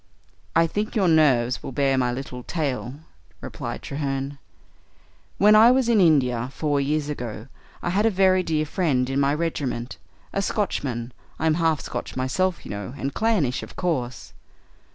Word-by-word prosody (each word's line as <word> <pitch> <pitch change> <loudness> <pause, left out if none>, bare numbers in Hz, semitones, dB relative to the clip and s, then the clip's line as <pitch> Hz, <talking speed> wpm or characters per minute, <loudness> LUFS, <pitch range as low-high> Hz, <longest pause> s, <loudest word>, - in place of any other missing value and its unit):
"I 165 - +5
think 210 +7 -3
your 195 -4 +3
nerves 130 -7 +3
will - - -6
bear 135 -1 +2
my 125 -2 +1
little 125 0 -6
tale," 135 -3 -3 0.4
replied - - -6
Treherne. 140 0 -3 1.0
"When 210 +1 +6
I 220 +2 +8
was 255 -1 +3
in 230 -4 +4
India, 130 -7 +3
four 145 -2 0
years 145 +1 0
ago, 120 -6 -5 0.4
I 175 - 0
had 205 +4 +2
a - - +5
very 190 -2 +3
dear 155 -3 0
friend 145 -6 0
in 135 - 0
my 140 +1 +2
regiment 135 -7 -3 0.3
a 195 - 0
Scotchman; 130 - -2 0.2
I'm 160 0 +2
half 160 -2 +1
Scotch - - -6
myself, 165 +8 -1
you - - -7
know, 100 +5 -6
and 135 +1 -3
clannish, 195 - +1
of - - -10
course. 130 -9 -3
145 Hz, 160 wpm, -24 LUFS, 130-180 Hz, 1.0 s, I